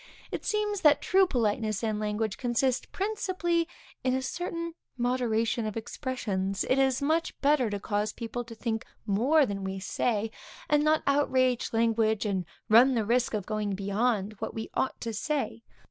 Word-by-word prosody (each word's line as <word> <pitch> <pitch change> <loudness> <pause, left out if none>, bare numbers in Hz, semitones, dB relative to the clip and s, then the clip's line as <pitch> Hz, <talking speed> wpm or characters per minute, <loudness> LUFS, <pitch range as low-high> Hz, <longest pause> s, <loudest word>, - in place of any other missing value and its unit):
It - - -4
seems 420 -2 0
that 300 -1 +6
true 380 0 +4
politeness 220 - 0
in 215 -2 0
language 210 0 -1
consists 250 +1 +1
principally 370 -4 -1 0.4
in 255 0 +2
a 260 - 0
certain 335 +4 -3 0.2
moderation 235 -2 0
of 215 - -4
expressions. 205 -6 -2
It 260 - +3
is 265 0 +2
much 320 +3 0
better 280 -5 +3
to 205 -1 -3
cause 210 +1 -1
people 235 +2 -5
to 230 0 -10
think 225 -1 -2 0.2
more 255 +9 +4
than 200 -4 -4
we 190 0 -3
say, 215 +2 -1 0.4
and 295 -6 +3
not 310 0 +3
outrage 260 -3 +2
language, 225 -1 +2
and 190 -4 -1 0.2
run 245 +4 +6
the 225 -3 +1
risk 240 +1 +1
of 205 -3 -3
going 210 -2 -2
beyond 205 +1 0
what - - -4
we 220 0 -5
ought 265 - -1
to 230 -1 -3
say. 275 0 -2
235 Hz, 165 wpm, -29 LUFS, 215-280 Hz, 0.4 s, that